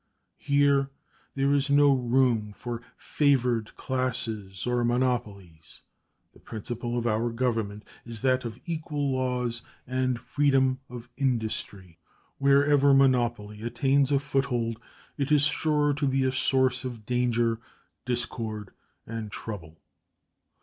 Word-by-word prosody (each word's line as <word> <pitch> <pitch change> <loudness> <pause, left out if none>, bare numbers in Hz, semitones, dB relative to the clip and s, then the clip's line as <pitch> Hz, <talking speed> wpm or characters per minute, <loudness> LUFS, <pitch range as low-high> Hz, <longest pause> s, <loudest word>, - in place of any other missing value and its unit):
Here 140 -1 +3 0.5
there 140 +1 +2
is 140 0 +2
no 145 0 +5
room 120 -4 +1
for 120 -1 -5 0.2
favored 125 -6 +1
classes 110 -7 -2
or 125 0 +1
monopolies; 115 -9 -2 0.5
the - - -19
principle 120 +2 -5
of 120 - -2
our 115 +1 +1
Government 115 -4 -2 0.2
is 115 -2 -7
that 130 -1 +2
of 115 -2 -6
equal 155 -4 -2
laws 125 -2 -1 0.2
and 130 -1 -1
freedom 130 0 +2
of 120 -1 -9
industry. 110 - -2 0.4
Wherever 140 0 +5
monopoly 120 -6 +2
attains 135 +4 +1
a 140 - +4
foothold, 125 -5 -1 0.4
it 140 +1 -1
is 150 -2 +5
sure 150 -1 +2
to 145 0 -1
be 135 0 +1
a 130 - +2
source 130 -1 +1
of 120 -4 -6
danger, 120 -1 +1 0.4
discord, 115 -4 -3 0.3
and 110 -2 -6
trouble. 85 -9 -7
125 Hz, 120 wpm, -27 LUFS, 115-135 Hz, 0.5 s, no